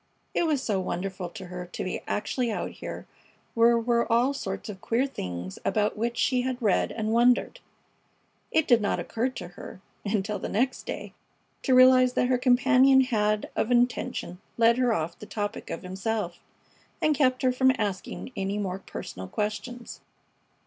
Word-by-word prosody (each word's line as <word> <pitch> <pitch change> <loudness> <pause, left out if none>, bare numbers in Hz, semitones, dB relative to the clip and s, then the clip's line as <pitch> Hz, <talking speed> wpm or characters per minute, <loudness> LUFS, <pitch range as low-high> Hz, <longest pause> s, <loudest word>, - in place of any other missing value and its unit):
It 340 - +1
was 290 -4 0
so 205 -4 0
wonderful 185 0 -4
to 190 +1 -9
her 180 0 -7
to - - -3
be 185 - -3
actually 230 +3 -1
out - - -3
here - - -7 0.5
where 235 +1 +5
were 235 0 +1
all 245 +4 +3
sorts 195 -8 -5
of 195 -3 -8
queer 240 +4 +1
things 90 - -6
about 210 -1 +1
which 235 +2 -2
she 255 -2 +2
had 255 0 -2
read 215 -6 +2
and 220 -1 -2
wondered. 240 +1 +3 0.9
It 320 - +2
did 240 -3 +5
not 205 - 0
occur 235 +3 -1
to 185 -9 -8
her, 180 - -10 0.2
until 205 0 -1
the - - -4
next 255 +5 -1
day, - - -5 0.5
to 260 - +3
realize 255 0 +7
that 250 - +1
her 255 -1 +2
companion 260 +1 +5
had 215 -4 0
of 225 - 0
intention 240 -7 0 0.2
led 230 +1 +4
her 250 -2 +3
off 165 -5 -2
the 210 - -9
topic 205 -1 -4
of 165 - -5
himself 190 0 -3 0.6
and 310 - +3
kept 255 -3 +2
her 255 - +4
from 260 +1 +4
asking 205 +4 -4
any 195 +1 -2
more 190 -2 -3
personal 95 - -7
questions. 215 - -4
230 Hz, 170 wpm, -27 LUFS, 195-250 Hz, 0.9 s, realize